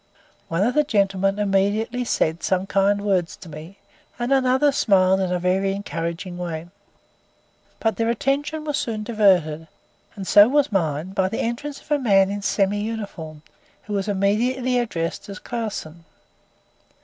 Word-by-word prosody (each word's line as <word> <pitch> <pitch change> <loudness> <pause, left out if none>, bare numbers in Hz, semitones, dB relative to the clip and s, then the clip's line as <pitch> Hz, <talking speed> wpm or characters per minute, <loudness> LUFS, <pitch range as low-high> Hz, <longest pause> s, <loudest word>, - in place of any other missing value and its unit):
One 165 +4 0
of 245 +4 +1
the 300 - +3
gentlemen 195 -5 +1
immediately 210 +4 0
said 160 -7 0
some 185 0 0
kind 200 +1 +1
words 185 -4 0
to - - -13
me, 160 +5 -10 0.4
and 240 +3 0
another 265 +2 +3
smiled 190 -7 +3
in 185 -2 -1
a 180 - +1
very 190 +2 +1
encouraging 175 -2 -5
way. 170 -1 -5 1.1
But 220 -4 0
their 230 0 +1
attention 285 +6 -1
was 295 -2 -1
soon 220 -2 -3
diverted, 185 -8 +2 0.5
and 195 - -6
so 205 +2 +7
was 290 -1 +2
mine 160 -3 -1
by 190 -1 0
the 225 - -3
entrance 275 +5 -4
of - - -21
a 295 - +3
man 195 -6 +3
in 205 0 -4
semi 200 0 +1
uniform, 195 -9 -6 0.4
who 210 - -6
was 195 0 -1
immediately 240 +6 +1
addressed 170 -7 -3
as 200 - -7
Clausen. 200 -10 -5
200 Hz, 155 wpm, -23 LUFS, 185-235 Hz, 1.1 s, so